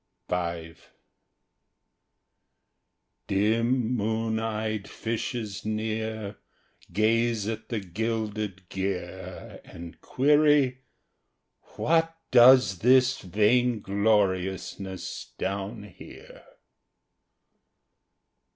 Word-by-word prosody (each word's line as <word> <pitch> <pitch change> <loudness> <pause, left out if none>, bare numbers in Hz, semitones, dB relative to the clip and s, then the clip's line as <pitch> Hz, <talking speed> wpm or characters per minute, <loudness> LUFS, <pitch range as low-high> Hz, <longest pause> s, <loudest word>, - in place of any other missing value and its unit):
V 85 -2 -2 2.5
Dim 115 +4 +1
moon 110 0 -1
eyed 110 -2 -3
fishes 110 -3 -4
near 110 -1 -3 0.5
Gaze 115 0 +1
at 110 0 -5
the 115 -3 -1
gilded 105 -1 -3
gear 95 -1 -5
And 85 0 -11
query: 145 -2 +3 1.0
"What 165 0 +1
does 120 -6 +7
this 130 +3 +4
vaingloriousness 100 -3 0
down 100 +3 -4
here?" 105 - -13
110 Hz, 60 wpm, -27 LUFS, 100-120 Hz, 2.5 s, does